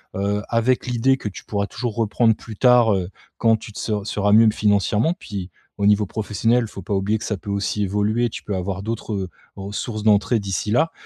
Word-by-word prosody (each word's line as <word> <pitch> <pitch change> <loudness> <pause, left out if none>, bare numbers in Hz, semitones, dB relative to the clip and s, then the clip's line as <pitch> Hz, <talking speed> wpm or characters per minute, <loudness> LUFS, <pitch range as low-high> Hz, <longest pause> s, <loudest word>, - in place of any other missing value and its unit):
Heu, 100 +2 -1
avec 120 +2 +1
l'idée 125 +2 +2
que 110 - -6
tu 95 - -10
pourras 100 -1 -2
toujours 110 +1 -4
reprendre 115 0 +2
plus 110 0 -10
tard, 125 -2 +5
heu, 95 -2 -1 0.3
quand 115 -1 +4
tu 110 - -11
te - - -7
ser 110 - -2
seras 105 0 0
mieux 110 +1 +7
financièrement. 105 - +1
Puis, 100 - -6 0.3
au 100 - +1
niveau 105 0 +4
professionnel, 115 +4 0
il - - -4
faut 100 - -8
pas 100 +2 -2
oublier 100 +3 0
que - - -7
ça 105 - -2
peut 100 - -6
aussi 100 +1 -1
évoluer. 105 +4 0
Tu - - -7
peux 105 - -3
avoir 95 +1 -3
d'autres, 110 +1 -4
heu, 95 -2 -3 0.3
ressources 105 +3 -5
d'entrée 105 +1 +3
d'ici 100 +1 -3
là. 160 +8 +2
105 Hz, 215 wpm, -22 LUFS, 100-115 Hz, 0.3 s, mieux